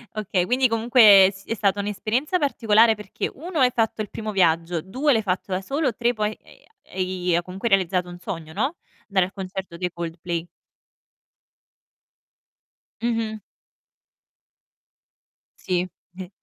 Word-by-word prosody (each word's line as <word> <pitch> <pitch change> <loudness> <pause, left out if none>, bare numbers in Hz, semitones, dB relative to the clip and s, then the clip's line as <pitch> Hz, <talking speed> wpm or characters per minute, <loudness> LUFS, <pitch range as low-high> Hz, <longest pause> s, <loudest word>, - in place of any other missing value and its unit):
Okay, 195 -4 0
quindi 255 +3 +3
comunque 220 -4 +6
si 195 +2 -15
è 225 - 0
stata 200 -1 +1
un'esperienza 220 - -1
particolare 225 -5 +4
perché 210 -2 -5
1: 330 +2 -5
hai 250 -1 +5
fatto 225 -2 0
il 210 - -5
primo 215 -1 -5
viaggio; 170 -3 +1
2: 260 - +1
l'hai 220 - +2
fatto 190 -1 -3
da 185 - -1
solo; 275 +5 -1
3: 240 0 +1
poi, 215 -1 -1
e - - -20
ha 435 -1 -28
e 190 - -3
i 180 -1 -1
hai 175 - +2
comunque 190 +6 -4
realizzato 180 -2 +1
un 175 0 -10
sogno, 165 -3 -6
no, 270 - -1 0.3
dare 190 -2 +2
al 190 - -11
concerto 190 -3 -6
dei 180 -1 -2
Coldplay. 170 0 -5 2.5
Mh-mh. 225 -2 -1 2.2
Sì. 180 0 -1 0.3
Eh 185 0 -8
200 Hz, 145 wpm, -23 LUFS, 180-230 Hz, 2.5 s, comunque